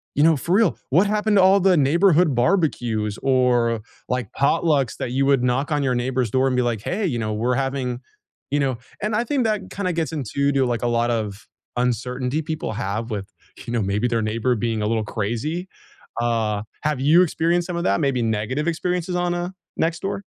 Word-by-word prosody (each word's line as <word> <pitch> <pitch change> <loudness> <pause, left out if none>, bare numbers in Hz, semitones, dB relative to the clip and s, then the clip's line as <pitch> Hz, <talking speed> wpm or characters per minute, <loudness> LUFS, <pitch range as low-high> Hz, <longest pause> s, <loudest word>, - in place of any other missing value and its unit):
You 145 - +3
know, 160 -1 +5
for 170 +6 -2
real, 210 -6 +3
what 175 +9 +4
happened 210 0 +1
to 185 - +6
all 195 +1 +6
the 185 -2 +4
neighborhood 165 +2 +4
barbecues 120 - 0
or, 120 -4 +2 0.3
like, 125 -5 -2
potlucks 140 -2 +1
that 120 - -4
you 135 +1 +1
would 135 -3 +3
knock 130 +5 0
on 145 -1 +1
your 130 -2 +1
neighbor's 125 -2 -1
door 130 +1 +2
and 130 - 0
be 125 - +2
like, 115 -4 -1
"Hey, 195 - -2
you 125 -9 -1
know, 110 -1 -2
we're 120 +4 0
having" 135 -2 -2 0.5
you 145 - +2
know, 130 -4 0 0.2
and 210 +1 -1
I 235 - +2
think 270 -1 0
that 210 -3 -1
kinda 185 -3 -2
gets 165 -1 -1
into 140 0 0
to, 135 -2 +2
like, 120 -1 -2
a - - +2
lot 120 0 +1
of 105 -3 -3 0.3
uncertainty 125 +4 -1
people 155 -6 -4
have 110 +2 -3
with, 100 -2 -4 0.4
you 120 - -5
know, 115 - +1
maybe 100 +5 0
their 115 -1 0
neighbor 115 +3 0
being 115 0 -1
a 105 - 0
little 110 -1 0
crazy? 120 - -3 0.5
Uh, 110 -3 0 0.2
have 150 -3 -1
you 160 +6 +6
experienced 170 0 +1
some 180 - -4
of 170 - -2
that, 100 - +2
maybe 135 -3 +1
negative 115 +7 -1
experiences 180 +1 -1
on, 175 0 0
uh, 175 0 -2 0.3
Nextdoor? 170 +5 -1
130 Hz, 205 wpm, -22 LUFS, 115-170 Hz, 0.5 s, to